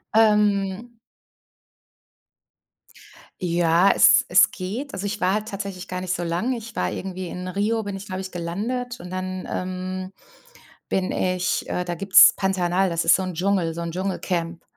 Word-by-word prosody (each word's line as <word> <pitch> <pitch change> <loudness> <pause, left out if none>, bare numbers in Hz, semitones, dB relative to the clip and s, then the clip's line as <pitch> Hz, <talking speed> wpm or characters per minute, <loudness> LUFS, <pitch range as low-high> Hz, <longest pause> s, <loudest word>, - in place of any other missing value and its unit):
Ähm 210 0 +2 2.5
Ja, 170 +1 +3
es - - +6
es 180 +1 +6
geht. 215 +10 -5
Also, 195 +1 -4
ich 210 +1 -3
war 185 +1 +2
halt 215 +1 -2
tatsächlich 200 -3 -6
gar 180 0 -4
nicht 185 0 -2
so 175 0 -3
lange. 180 +10 -1
Ich 225 +1 -10
war - - -1
irgendwie 185 -1 -5
in 180 +1 -6
Rio, 210 +4 -1
bin 200 -1 -5
ich, 195 +2 -8
glaube 185 -1 -5
ich, 190 0 -7
gelandet 230 +9 -4
und 180 - -9
dann, 185 0 -5
ähm, 185 +1 -4 0.8
bin 190 -1 0
ich, 185 0 -1
äh 180 - -2
da 175 - -3
gibt's 195 +2 +7
Pantanal, 190 -1 +1
das 170 -1 -1
ist - - +7
so - - -1
'n 185 -2 -5
Dschungel, 180 -2 0
so 170 - -4
'n 170 -1 -4
Dschungelcamp. 180 -2 -3
185 Hz, 165 wpm, -23 LUFS, 180-200 Hz, 2.5 s, gibt's